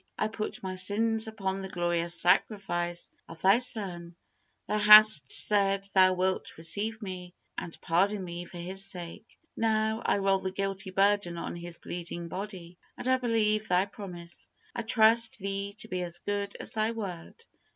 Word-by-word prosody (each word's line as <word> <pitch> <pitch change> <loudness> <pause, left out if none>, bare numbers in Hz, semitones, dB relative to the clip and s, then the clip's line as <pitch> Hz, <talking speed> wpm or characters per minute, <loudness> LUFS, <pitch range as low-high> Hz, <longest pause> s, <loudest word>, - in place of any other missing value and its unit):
I 215 - 0
put 215 -2 -6
my 190 -1 -4
sins 220 +4 +1
upon 195 -3 -3
the 190 - -6
glorious 175 -1 -1
sacrifice 175 -1 0 0.2
of 165 0 -11
Thy 195 +5 +5
Son. 180 -8 -1 0.5
Thou 210 - 0
hast 210 -9 +8
said 195 -1 +3
Thou 185 -1 +5
wilt 185 +1 -2
receive 210 +7 -2
me, 180 -2 -8 0.2
and 165 - -7
pardon 195 +4 +1
me 175 0 -6
for 175 - -11
His 185 +3 -1
sake. 180 +1 -8 0.2
Now, 220 0 0
I - - +1
roll 195 -1 +2
the 190 - -3
guilty 195 0 -3
burden 195 -2 +1
on 170 - -5
His 170 0 -6
bleeding 170 -1 -6
body, 180 -2 -7 0.2
and - - -3
I 260 0 +4
believe 215 -3 0
Thy 180 +2 +2
promise, 180 -4 -10 0.2
I - - -3
trust 225 0 +3
Thee 200 0 -4
to 220 - -6
be 185 -3 -3
as 175 -1 -3
good 200 +1 -4
as - - -3
Thy 220 0 0
word." 210 - -7
195 Hz, 165 wpm, -29 LUFS, 175-215 Hz, 0.5 s, hast